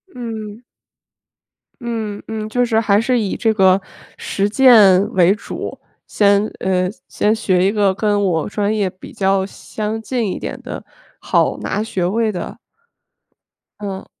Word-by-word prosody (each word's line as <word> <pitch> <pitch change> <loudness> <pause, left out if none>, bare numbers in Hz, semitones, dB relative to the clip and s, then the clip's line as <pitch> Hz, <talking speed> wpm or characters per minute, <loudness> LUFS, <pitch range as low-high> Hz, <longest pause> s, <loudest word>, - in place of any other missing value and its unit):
嗯。 220 -3 -6 1.2
嗯 220 -3 -4
嗯， 215 -1 -4
就 245 +3 0
是 230 -2 +2
还 210 -2 +3
是 250 +1 +1
以 205 -4 -2
这 225 - +1
个 190 -1 +4 0.4
实 200 0 -1
践 210 -5 +6
为 185 0 +4
主， 215 - -7 0.3
先， 200 0 +3
嗯 185 -1 0 0.2
先 210 - +1
学 185 -4 +1
一 195 - +3
个 205 -3 +2
跟 205 0 +1
我 165 -5 0
专 205 +1 -1
业 205 -3 +1
比 185 +1 -10
较 195 0 +1
相 215 +2 -5
近 225 -3 -2
一 - - -4
点 - - -6
的、 - - -7 0.3
好 - - +1
拿 210 - -2
学 190 -5 -2
位 220 +4 0
的。 180 - -6 1.2
嗯。 195 -2 -6
205 Hz, 155 characters per minute, -18 LUFS, 195-220 Hz, 1.2 s, 践